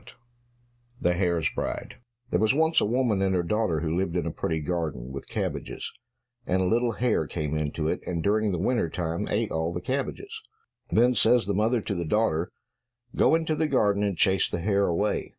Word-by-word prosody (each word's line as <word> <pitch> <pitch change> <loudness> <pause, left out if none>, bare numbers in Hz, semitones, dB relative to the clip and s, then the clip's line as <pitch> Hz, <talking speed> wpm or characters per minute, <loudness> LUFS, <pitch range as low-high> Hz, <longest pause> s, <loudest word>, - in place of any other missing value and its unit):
66 - - -17 0.8
The 90 - +3
Hare's 85 -3 0
Bride - - -4 0.3
There 90 - +2
was 110 +5 +3
once 160 +1 +3
a - - +2
woman 115 -3 +1
and 95 -1 +2
her 90 - +1
daughter 90 -4 0
who 80 0 -1
lived 90 -1 -1
in 85 -3 0
a 85 - -2
pretty 80 +1 -2
garden 75 -6 -3
with 70 0 -7
cabbages; - - -4 0.5
and 95 - +1
a 95 - +1
little 115 +4 +2
hare 120 +1 0
came 75 -2 -3
into 75 +1 -2
it, 90 - -1
and 85 -2 -2
during 105 +1 +2
the 90 - -1
winter 105 0 0
time 85 0 -3
ate - - -1
all 80 +1 -1
the 90 - -3
cabbages. 260 - -4 0.5
Then 120 +2 +4
says 120 0 +4
the 100 - -1
mother 110 +4 +1
to 105 - -3
the 85 -2 -2
daughter, 85 -4 +1 0.6
"Go - - +4
into 160 -1 0
the 155 +1 +1
garden, 105 -8 +2
and 100 -4 0
chase 95 0 +3
the 85 - -3
hare 100 +1 +2
away." 95 +5 0
95 Hz, 205 wpm, -26 LUFS, 85-115 Hz, 0.8 s, Then